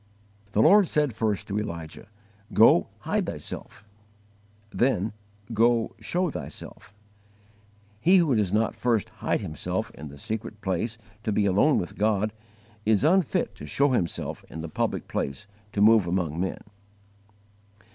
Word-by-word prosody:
The 110 - +4
Lord 205 -2 +6
said 150 -5 +1
first 105 -2 -1
to 100 +2 -1
Elijah, 85 -5 -6 0.5
"Go, 105 -5 +6
HIDE - - -1
THYSELF"; 100 - -7 0.9
then, 110 -5 +1 0.4
"Go, 115 +1 +3
SHOW 175 +10 -1
THYSELF." - - -8 1.1
He 180 - +5
who 165 -6 +3
does 105 -5 +1
not 110 +2 +1
first 115 -3 0
hide - - 0
himself 80 -7 -3
in 75 - -9
the 70 0 -11
secret 110 +5 -5
place 100 +4 -2 0.2
to 110 - -2
be 105 0 +2
alone 100 +10 +4
with 90 - -4
God, 105 0 +1 0.5
is 110 +1 +2
unfit 175 +1 +2
to 75 - -10
show 140 - +2
himself 90 -9 -2
in 80 - -7
the 80 - -6
public - - -2
place 85 +10 -3 0.3
to 100 - 0
move 110 -3 +6
among 85 -3 -1
men. 95 +1 -2
105 Hz, 140 wpm, -26 LUFS, 95-120 Hz, 1.1 s, Lord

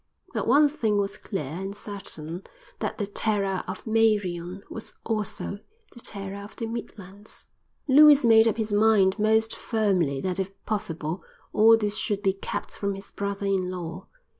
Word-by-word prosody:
But - - -2
one 290 +5 +6
thing 235 -8 0
was 200 +1 -1
clear 195 -7 -4
and 185 +8 -5
certain: 175 -5 -7 0.4
that - - -3
the 210 - -1
terror 200 -2 -1
of - - -6
Meirion 200 -5 +1
was 220 - -7
also 210 -2 -3 0.3
the 240 - -12
terror 200 -3 -6
of 205 - -11
the 230 - -4
Midlands. 210 -3 -8 0.4
Lewis 295 0 +8
made 225 -1 +7
up 225 - +1
his 215 -2 -2
mind 205 -2 +4
most 220 +1 +2
firmly 190 - 0
that 185 +4 -2
if 190 0 -1 0.2
possible 165 -5 -3 0.3
all 225 +1 +7
this 210 -1 0
should 205 -1 -1
be 195 -2 +3
kept 195 - -5
from 200 -1 -2
his 195 +1 -10
brother 200 0 -3
in 190 -2 +1
law. 180 0 -6
205 Hz, 165 wpm, -26 LUFS, 190-220 Hz, 0.4 s, Lewis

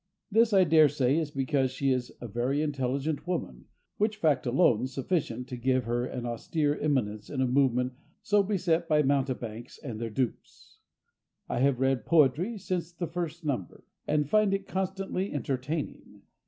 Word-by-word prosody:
This, 225 +2 +4
I 195 -2 +6
daresay, 150 -4 +4
is 155 -3 -2
because 135 -1 0
she 135 +1 0
is 125 -1 -1
a 120 - -6
very 125 +7 0
intelligent 140 +2 -2
woman, 65 - -3 0.3
which 215 +1 0
fact 150 -10 +1
is - - +1
alone 125 -1 +3
sufficient 130 -3 -2
to 125 - -4
give 130 +1 +1
her 120 +2 -1
an 125 -1 -5
austere 145 +5 -1
eminence 110 -8 -1
in 140 - -4
a 130 - +3
movement 125 -1 +2 0.3
so 205 -1 +4
beset 180 -4 0
by 150 -1 +4
mountebanks 130 -4 -2
and 120 -7 -7
their 115 - -2
dupes. 125 +2 -4 0.7
I - - -2
have 135 -1 +2
read 130 -4 +1
Poetry 165 - +3
since 180 -3 -3
the 170 0 -4
first 170 -1 -5
number, 125 - -3 0.2
and 150 -1 +1
find 210 +3 +3
it 195 0 -5
constantly 190 0 -2
entertaining. 145 +2 -4
140 Hz, 165 wpm, -29 LUFS, 125-170 Hz, 0.7 s, I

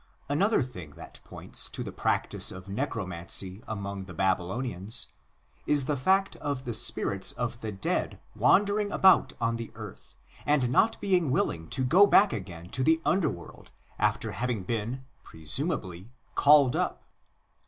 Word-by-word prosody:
Another 190 +5 +2
thing 90 - -10
that - - -11
points - - -6
to - - -5
the - - -6
practice - - 0
of 95 +1 -10
Necromancy 95 - -3
among 100 -2 -5
the 90 -2 -11
Babylonians 95 +3 0 0.6
is 145 -3 +3
the 150 - 0
fact 190 +9 +1
of 140 -2 -4
the 120 - -3
spirits 100 -3 +1
of 120 -1 -4
the 110 - -4
dead 95 -1 -2 0.2
wandering 205 +1 +3
about 190 -1 +5
on 115 0 0
the 115 -1 -6
earth - - -11 0.3
and 140 -5 +1
not 225 - +3
being 180 -6 +2
willing 80 -10 -1
to 130 - -2
go 185 +10 +6
back 205 0 +5
again 90 -4 -7
to 130 - -2
the 160 +3 +3
underworld 150 - -2 0.3
after - - 0
having 120 -3 -2
been, 115 +5 -3 0.2
presumably, 95 - -5 0.2
called 145 -3 +5
up. - - -2
120 Hz, 145 wpm, -28 LUFS, 95-150 Hz, 0.6 s, go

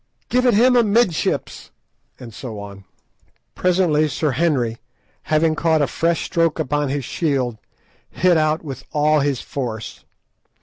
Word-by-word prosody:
Give 250 +1 +2
it 240 - +4
him 250 +4 +5
amidships," 220 -6 +1 0.5
and 115 -3 -10
so 110 -3 -7
on. 100 -1 -10 0.7
Presently 175 -4 +2
Sir 150 +1 -1
Henry, 130 -6 0 0.4
having 155 +1 +1
caught 160 -1 +1
a - - +3
fresh 165 +3 -1
stroke 165 -3 +1
upon 145 +1 -1
his 140 -2 -2
shield, 130 -9 -1 0.5
hit 180 -1 +2
out 155 0 +1
with 135 -4 -7
all 150 +1 +3
his 140 -2 -1
force. 115 -5 -6
155 Hz, 135 wpm, -20 LUFS, 130-170 Hz, 0.7 s, him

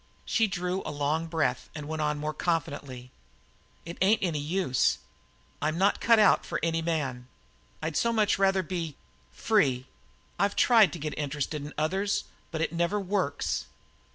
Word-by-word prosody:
She 225 - +2
drew 180 0 -2
a - - -5
long 150 +3 -1
breath 160 -6 -1
and 150 -2 -6
went 160 0 -3
on 150 0 0
more 150 +1 -3
confidently: 140 -7 -3 0.7
"It 170 +1 -8
ain't 200 +3 +4
any 165 -5 0
use; 145 -4 +1 0.6
I'm 155 +2 0
not 195 +3 +2
cut 230 -1 +5
out 210 -3 +5
for - - -3
any 165 0 +1
man 140 -7 -2 0.6
I'd 160 -1 -2
so 235 - +2
much 215 -3 +2
rather 195 -1 +3
be 165 -3 -4 0.3
free. 130 - +1 0.5
I've 200 0 +2
tried 225 - +6
to - - -4
get 150 0 -4
interested 145 +1 -3
in 145 - -8
others, 190 +6 0 0.3
but 160 -2 -3
it 165 - -1
never 170 +5 +1
works." 190 -7 -1
165 Hz, 160 wpm, -28 LUFS, 145-190 Hz, 0.7 s, tried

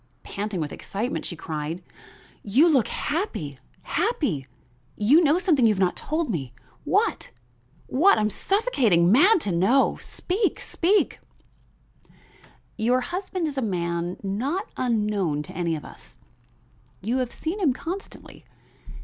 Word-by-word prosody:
Panting 205 -2 -4
with 150 -2 -3
excitement 230 +7 -4
she 175 - -5
cried: 155 +2 -5 0.6
"You 255 - +4
look 270 -9 +3
happy, 290 - -3 0.3
happy! 290 - -1 0.5
You 270 +12 +5
know 305 +2 +4
something 335 -8 +2
you 220 -2 +5
have - - -5
not 185 -2 +2
told 315 +1 -2
me. 135 - -4 0.3
What? - - +1 0.6
what? 325 +7 +4
I'm 210 0 +1
suffocating, 245 - +2
mad 365 - +6
to 200 - -2
know; 195 +11 +3
speak 390 +3 -2
speak 390 +5 +1 0.8
" - - -29
"Your 250 +2 +3
husband 360 +3 -3
is 280 -3 -3
a - - -1
man 175 -4 -2
not 265 - -2
unknown 210 -10 0
to - - -11
any 170 -1 0
of 150 - -7
us. - - -14 0.9
You 235 +6 0
have 255 -2 -1
seen 340 +6 -4
him 335 -9 +3
constantly. 350 +9 -7
240 Hz, 135 wpm, -25 LUFS, -, 0.9 s, mad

